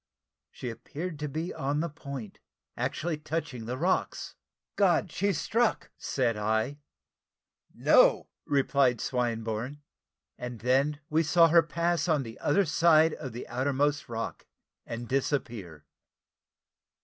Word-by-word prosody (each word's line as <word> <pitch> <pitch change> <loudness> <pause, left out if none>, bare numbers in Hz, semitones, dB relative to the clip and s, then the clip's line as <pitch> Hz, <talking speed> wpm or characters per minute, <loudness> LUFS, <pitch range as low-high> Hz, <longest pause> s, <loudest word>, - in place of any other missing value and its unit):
She 125 - -6
appeared 155 +7 -6
to 150 - -2
be 160 +5 -3
on 140 +2 -1
the 170 - 0
point 140 -8 -8 0.4
actually 160 -1 -2
touching 150 -7 -4
the 125 +2 -3
rocks 180 +6 -1 0.4
"God! 180 -4 +3
she's 200 -1 0
struck!" 235 0 0
said 125 -4 0
I. 110 +6 0 0.9
"No!" - - +4 0.2
replied 135 -3 +2
Swinburne; 120 +2 -2 0.6
and 125 -2 -6
then 135 +5 +2
we 160 +1 +4
saw 165 +2 +5
her 170 +1 +7
pass 170 +3 0
on 155 -5 +2
the 115 -2 -9
other 195 +7 +2
side 160 0 +4
of 130 -4 -6
the 120 +2 -7
outermost 140 +3 0
rock, 115 -1 -5 0.4
and 120 +1 -5
disappear. 115 - -2
140 Hz, 125 wpm, -29 LUFS, 120-160 Hz, 0.9 s, her